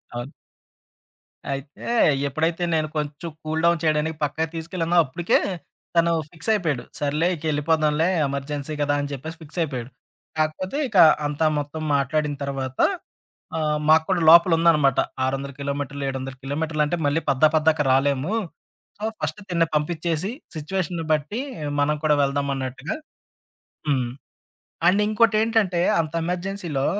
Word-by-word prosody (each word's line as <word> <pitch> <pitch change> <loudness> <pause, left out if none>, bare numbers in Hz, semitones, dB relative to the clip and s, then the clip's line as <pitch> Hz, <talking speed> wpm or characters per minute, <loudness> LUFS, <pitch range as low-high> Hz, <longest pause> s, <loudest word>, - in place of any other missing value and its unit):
అవును. 120 +4 -5 1.2
అయితే 140 +2 -6 0.4
ఎప్పుడైతే 160 +5 -1
నేను 155 -1 +1
కొంచెం 150 +3 -3
కూల్ 155 +1 -1
డౌన్ 170 -1 +4
చేయడానికి 155 0 +1
పక్కగా 160 +2 -1
తీసుకెళ్ళానో 165 +1 -2
అప్పటికే. 165 +5 +1 0.6
తను 170 0 +4 0.2
ఫిక్సయిపోయాడు. 170 - 0 0.2
సర్లే 150 +3 0
ఇకెళ్ళిపోదాంలే 155 0 +1 0.2
ఎమర్జెన్సీ 140 +2 -4
కదా! 145 0 +2
అని 145 0 -4
చెప్పేసి 155 +4 -6
ఫిక్సయిపోయాడు. 145 -6 -3 0.5
కాకపోతే 155 - -1
ఇక 215 - -5 0.3
అంతా 150 +2 0
మొత్తం 145 +2 -4
మాట్లాడిన 145 +2 0
తర్వాత, 135 -2 -4 0.8
ఆహ్, 150 -1 +1
మాకు 160 0 +6
కూడా 185 -2 +2
లోపల 170 +2 +8
ఉందనమాట. 150 -6 +4 0.3
600 135 +1 -2
కిలోమీటర్లు, 140 0 -3
700 135 0 -5
కిలోమీటర్లు 150 +2 -1
అంటే 175 +4 -1
మళ్ళీ 145 +3 +1
పద్దా 135 +3 +5
పద్దాక 155 -1 +3
రాలేము. 140 +4 +2 0.7
సో, - - -8 0.2
ఫస్ట్ 210 - -3
తినని 170 -2 +2
పంపించేసి. 165 +4 -1 0.2
సిట్యుయేషన్‌ని 170 +1 -3
బట్టి 155 - -2 0.4
మనం 150 +1 +2
కూడా 150 -1 +4
వెళ్దామన్నట్టుగా 140 - -2 0.9
హ్మ్. 130 -4 +1 0.8
అండ్ 195 +3 +4
ఇంకోటేంటంటే 215 -4 +2 0.2
అంత 155 -2 -3
ఎమర్జెన్సీలో 175 -5 -2
155 Hz, 120 wpm, -23 LUFS, 140-170 Hz, 1.2 s, లోపల